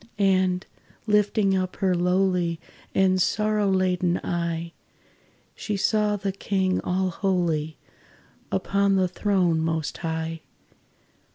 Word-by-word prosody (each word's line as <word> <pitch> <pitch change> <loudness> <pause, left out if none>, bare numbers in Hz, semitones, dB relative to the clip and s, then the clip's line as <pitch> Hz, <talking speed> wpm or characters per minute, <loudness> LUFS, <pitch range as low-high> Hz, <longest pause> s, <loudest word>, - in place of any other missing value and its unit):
And, 185 -2 +2 0.4
lifting 210 -2 +2
up 185 -1 -2
her 190 -2 +1
lowly 180 -1 +1 0.4
And 185 -1 +3
sorrow 210 +1 +1
laden 180 -2 +1
eye, 170 -1 -3 0.8
She 210 -2 -4
saw 210 +1 +1
the 195 -1 -2
King 190 -1 -1
all 185 +1 0
holy 170 -5 -1 0.7
Upon 200 - +1
the 190 -1 +2
throne 180 -3 +1
Most 160 -1 -2
High. 160 -1 -3
185 Hz, 105 wpm, -25 LUFS, 170-195 Hz, 0.8 s, And